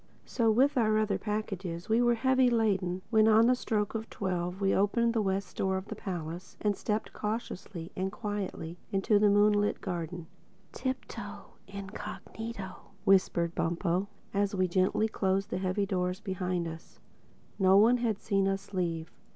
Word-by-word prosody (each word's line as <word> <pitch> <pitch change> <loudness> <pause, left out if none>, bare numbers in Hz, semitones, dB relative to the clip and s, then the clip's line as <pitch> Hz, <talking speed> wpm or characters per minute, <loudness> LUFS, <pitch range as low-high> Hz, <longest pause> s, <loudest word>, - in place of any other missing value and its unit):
So, 230 -3 +1
with 260 +5 +4
our 215 -2 +3
other 215 -1 +1
packages, 195 -5 -4
we 225 +2 +3
were 240 -1 +4
heavy 260 +1 +3
laden 195 -6 +1
when 220 -1 +5
on 220 +1 +6
the 250 - +5
stroke 215 -4 -1
of 225 0 -4
twelve 180 -1 -2
we 195 -1 +2
opened 230 +4 +2
the 225 - +2
west 195 -1 -2
door 190 0 +1
of 190 - -5
the - - -4
palace 175 -1 -6
and 205 -1 +1
stepped 210 +2 -2
cautiously 210 -5 -5
and 190 +1 -2
quietly 195 -6 -4
into 200 +2 +3
the 210 0 +5
moonlit 205 0 +3
garden. 175 -2 -4 0.5
"Tiptoe 260 0 -5
incognito," 200 +1 -7 0.3
whispered 185 -4 +3
Bumpo 175 +3 0 0.3
as 200 0 +1
we 185 -1 +2
gently 185 +4 +2
closed 195 -2 0
the - - -1
heavy 190 +2 0
doors 180 -1 -1
behind 185 -4 -2
us. 160 0 -10 0.6
No 190 0 +6
one 230 +4 +6
had 225 -4 -1
seen 195 -2 +1
us 195 +1 -3
leave. 165 -3 -2
195 Hz, 160 wpm, -30 LUFS, 185-215 Hz, 0.6 s, on